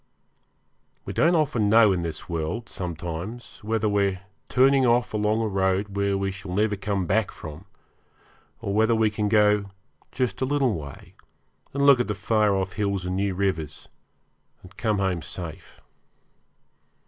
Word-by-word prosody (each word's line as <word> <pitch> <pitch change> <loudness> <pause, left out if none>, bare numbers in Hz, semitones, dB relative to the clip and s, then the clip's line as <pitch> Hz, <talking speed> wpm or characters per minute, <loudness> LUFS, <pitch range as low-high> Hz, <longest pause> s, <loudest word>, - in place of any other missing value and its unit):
We - - -5
don't 170 +2 +3
often 125 -10 +1
know 110 -1 +6
in 90 -2 0
this 80 -2 -5
world 85 +7 -3
sometimes 90 +7 -6
whether 110 0 0
we 100 -1 +2
are - - -12 0.3
turning 135 +1 +4
off 120 0 +2
along 105 +1 +1
a - - 0
road 95 0 0
where 100 0 +1
we 95 0 -1
shall 95 -1 -7
never 105 +1 +2
come 100 -1 -2
back 105 +4 +1
from, 80 +4 -10 1.0
or 100 - -3
whether 110 +2 +3
we 110 -1 +2
can 105 0 -1
go 105 -1 +4 0.5
just 130 -1 -2
a - - +2
little 135 -3 +1
way 70 -6 -8 0.6
and 140 0 0
look 140 -3 +7
at 120 - 0
the 105 - -2
far 105 0 +2
off 95 -1 -2
hills 100 -3 -1
and 90 0 -2
new 100 0 -1
rivers, 90 -6 -2 0.7
and 95 +2 -15
come 110 -2 0
home 95 -3 0
safe. 85 -1 -8
100 Hz, 160 wpm, -25 LUFS, 95-110 Hz, 1.0 s, look